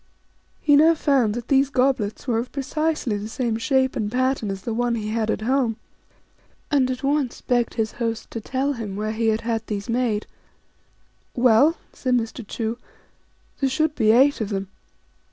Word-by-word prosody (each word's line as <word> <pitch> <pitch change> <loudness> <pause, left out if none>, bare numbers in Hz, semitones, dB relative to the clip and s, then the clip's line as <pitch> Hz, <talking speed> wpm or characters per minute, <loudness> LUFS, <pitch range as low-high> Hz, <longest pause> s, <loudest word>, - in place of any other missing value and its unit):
He 290 -2 +4
now 320 +3 +6
found 265 -8 +2
that 240 0 -5
these 275 0 +3
goblets 250 -6 0
were 230 -2 +1
of 240 - -5
precisely 295 -4 -1
the 205 - -5
same 235 -1 -1
shape 265 +1 +1
and 210 -1 -2
pattern 255 -3 0
as 195 -1 -5
the 230 - -3
one 240 +1 0
he 215 -2 -3
had 220 0 -1
at - - -1
home, 240 -1 +1 0.9
and 270 -3 +3
at 255 +1 -4
once 280 -2 0
begged 245 -1 0
his 220 -2 -1
host 230 -2 -4
to 230 - -5
tell 270 +5 -1
him 220 -6 -5
where 215 +1 -2
he 225 +1 -1
had 220 0 +1
had 225 -1 -2
these 205 +1 -4
made. 230 -3 0 0.6
" - - -40
Well," 270 +8 +5 0.2
said 255 -2 0
Mr. 230 0 -2
Chu, 225 +1 -3 0.4
" - - -38
there 270 - +2
should 310 +3 +1
be 220 -7 +1
eight 265 +3 +4
of 210 - -2
them. 195 -2 -3
240 Hz, 190 wpm, -23 LUFS, 220-270 Hz, 0.9 s, now